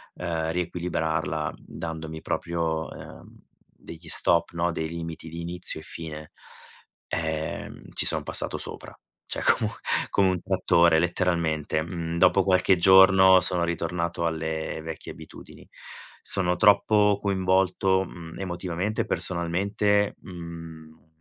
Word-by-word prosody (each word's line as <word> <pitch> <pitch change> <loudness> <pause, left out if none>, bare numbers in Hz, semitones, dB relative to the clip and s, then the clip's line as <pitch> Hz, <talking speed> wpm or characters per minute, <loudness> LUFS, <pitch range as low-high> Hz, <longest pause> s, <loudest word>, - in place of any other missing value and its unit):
ehm, 80 -2 -3
riequilibrarla, 80 -3 -2
dandomi 80 -1 -7
proprio, 80 -2 -2
ehm, - - -12 0.3
degli 85 0 -13
stop 85 +1 +4
no, 85 +1 0
dei 80 -1 -3
limiti 85 -1 -7
di 85 +1 -7
inizio 85 -1 0
e - - -12
fine. 75 -2 -6 0.8
Ehm, 80 -1 -4
ci - - +4
sono - - +2
passato - - -1
sopra, - - -6 0.4
cioè - - -4
comun - - +2 0.4
come 95 -1 +3
un 90 -2 -2
trattore, 85 -3 +3
letteralmente. 85 -3 0
Mhmm, 85 0 -5
dopo 95 +2 +4
qualche 95 0 +3
giorno 95 +1 +7
sono 90 -2 +3
ritornato 85 0 -2
alle 80 -1 -3
vecchie 80 0 -7
abitudini. 80 0 -13 0.5
Sono 90 -2 +2
troppo 105 0 +4
coinvolto, 95 -1 +1
mhmm, 80 -1 -11
emotivamente 90 +2 -3
e - - -3
personalmente, 100 +4 0
mhmm, 80 -3 -11
85 Hz, 120 wpm, -25 LUFS, 80-95 Hz, 0.8 s, giorno